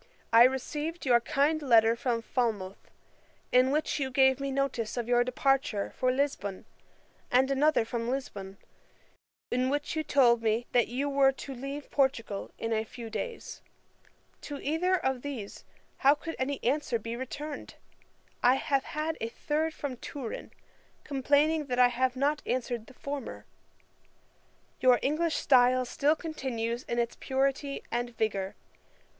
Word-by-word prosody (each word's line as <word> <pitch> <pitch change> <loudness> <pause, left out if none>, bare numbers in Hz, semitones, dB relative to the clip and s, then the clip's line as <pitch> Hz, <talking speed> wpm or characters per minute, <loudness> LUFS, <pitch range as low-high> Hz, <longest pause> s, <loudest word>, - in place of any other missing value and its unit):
I 230 +1 +9
received 295 +6 -2
your 245 -2 +5
kind 290 +6 +1
letter 230 -4 +5
from 235 -1 -1
Falmouth, 215 -7 -2 0.6
in 255 +1 +5
which 300 +1 0
you 270 -2 -1
gave 265 0 +4
me 275 0 -2
notice 265 -4 -2
of 235 -1 -2
your 245 0 +4
departure 255 -4 0
for 255 -1 +1
Lisbon, 255 -8 -2 0.6
and 260 +2 +3
another 280 -3 +3
from 230 0 -3
Lisbon, 200 -7 -5 0.9
in 255 +1 +1
which 290 +3 -2
you 315 - 0
told 240 -6 +4
me, 225 +1 +1
that 240 -2 +3
you 260 +5 -2
were 275 -1 +4
to 270 +1 -8
leave 275 +3 -7
Portugal 245 -7 0
in 225 0 -2
a 220 0 +1
few 225 0 -9
days. 470 - -5 0.8
To 290 - -6
either 340 +6 +1
of 265 -5 -1
these 245 -8 -7 0.3
how 280 +2 +5
could 325 +2 -6
any 270 +1 -1
answer 270 -1 +1
be 230 +1 -5
returned? 285 +4 -6 0.7
I 250 +1 +5
have 275 0 0
had 310 +1 -3
a 225 - -2
third 305 +6 -1
from 285 -5 -5
Turin, 250 -2 -6 0.5
complaining 290 +2 +2
that 250 -2 -2
I 250 0 +6
have 255 +1 0
not 290 +3 +1
answered 240 -3 -2
the 265 - -15
former. 280 -1 -6 1.3
Your 255 -1 +5
English 315 +3 +1
style 255 -1 +4
still 290 +5 +2
continues 250 -8 -3
in 235 - -3
its 235 -1 -1
purity 275 +1 -1
and 240 0 -3
vigour. 200 -3 -1
260 Hz, 150 wpm, -29 LUFS, 235-285 Hz, 1.3 s, I